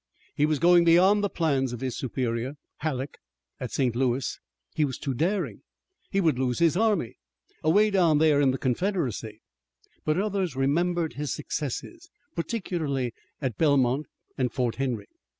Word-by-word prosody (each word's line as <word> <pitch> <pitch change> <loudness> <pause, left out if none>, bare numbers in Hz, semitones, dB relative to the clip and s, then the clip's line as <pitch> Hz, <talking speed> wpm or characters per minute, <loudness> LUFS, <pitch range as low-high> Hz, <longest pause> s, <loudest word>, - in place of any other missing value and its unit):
He 150 0 +2
was 155 -1 +1
going 175 +4 +6
beyond 185 +5 +5
the 205 - +1
plans 135 -8 0
of 120 - -5
his 130 -2 -2
superior, 125 0 -2 0.2
Halleck, 140 -3 -3 0.4
at - - -4
St. 125 -4 0
Louis. 125 0 0 0.3
He 155 - +1
was 135 -4 -1
too 135 - -3
daring, 180 - -1 0.5
he 195 - +1
would 160 -9 +2
lose 125 -2 0
his 165 -1 +3
army, 210 - +1 0.5
away 205 +7 +4
down 175 -6 +4
there 150 -2 +4
in 140 - +4
the 130 - 0
Confederacy. 125 - -2 0.6
But 155 +1 +1
others 195 -6 -1
remembered 165 +5 +1
his 145 0 -3
successes, 330 - -5 0.2
particularly 160 - -2 0.3
at 125 -6 -2
Belmont 140 -2 +3 0.3
and 125 -2 +1
Fort 120 -4 -1
Henry. 125 -6 -2
145 Hz, 150 wpm, -27 LUFS, 130-175 Hz, 0.6 s, going